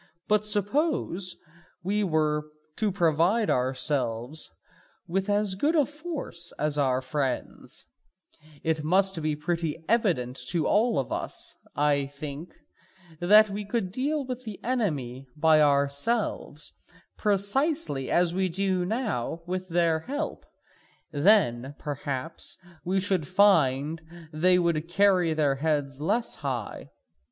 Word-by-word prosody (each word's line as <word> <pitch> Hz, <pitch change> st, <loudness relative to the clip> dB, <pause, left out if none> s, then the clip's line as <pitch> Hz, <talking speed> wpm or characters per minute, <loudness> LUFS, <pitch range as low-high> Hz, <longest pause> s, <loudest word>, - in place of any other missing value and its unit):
But 210 Hz, 0 st, +3 dB
suppose 210 Hz, -, +1 dB, 0.5 s
we 205 Hz, +3 st, 0 dB
were 155 Hz, -3 st, 0 dB, 0.3 s
to 215 Hz, -2 st, +1 dB
provide 175 Hz, +5 st, +2 dB
ourselves 130 Hz, +1 st, 0 dB, 0.6 s
with 195 Hz, +3 st, -1 dB
as 205 Hz, -1 st, +2 dB
good 290 Hz, -, +1 dB
a 295 Hz, -3 st, +4 dB
force 295 Hz, -, -3 dB
as 150 Hz, 0 st, -1 dB
our 130 Hz, -3 st, +1 dB
friends, 130 Hz, 0 st, -4 dB, 0.8 s
it 160 Hz, -1 st, 0 dB
must 190 Hz, +2 st, +3 dB
be 155 Hz, -1 st, -1 dB
pretty 165 Hz, 0 st, -2 dB
evident 175 Hz, -, +1 dB
to 165 Hz, 0 st, 0 dB
all 220 Hz, -4 st, +2 dB
of 135 Hz, -, -2 dB
us, -, -, -4 dB, 0.2 s
I 145 Hz, -1 st, +2 dB
think, 145 Hz, +3 st, -8 dB, 0.7 s
that 210 Hz, +4 st, +6 dB
we 205 Hz, +1 st, -4 dB
could 220 Hz, +2 st, -1 dB
then 185 Hz, -, -6 dB
deal 280 Hz, +6 st, -1 dB
with 255 Hz, 0 st, -5 dB
the 215 Hz, -5 st, -7 dB
enemy 145 Hz, -, -2 dB
by 155 Hz, 0 st, +5 dB
ourselves 140 Hz, +9 st, 0 dB, 0.4 s
precisely 205 Hz, -, 0 dB
as 175 Hz, -1 st, +2 dB
we 190 Hz, 0 st, 0 dB
do 185 Hz, +1 st, 0 dB
now 180 Hz, -, -2 dB
with 185 Hz, +1 st, -4 dB
their 165 Hz, -1 st, +2 dB
help, 290 Hz, -, -5 dB, 0.7 s
and 145 Hz, +4 st, -1 dB
then 135 Hz, -, +3 dB
perhaps 145 Hz, +1 st, -4 dB, 0.3 s
we 190 Hz, +2 st, 0 dB
should 190 Hz, -6 st, 0 dB
find 160 Hz, -6 st, +3 dB, 0.3 s
that 155 Hz, -, -8 dB
they 180 Hz, +2 st, +5 dB
would 170 Hz, -3 st, 0 dB
carry 180 Hz, -3 st, +3 dB
their 145 Hz, -3 st, +1 dB
heads 145 Hz, -2 st, -1 dB
less 220 Hz, +9 st, 0 dB
high. 130 Hz, -6 st, -5 dB
170 Hz, 125 wpm, -27 LUFS, 145-205 Hz, 0.8 s, that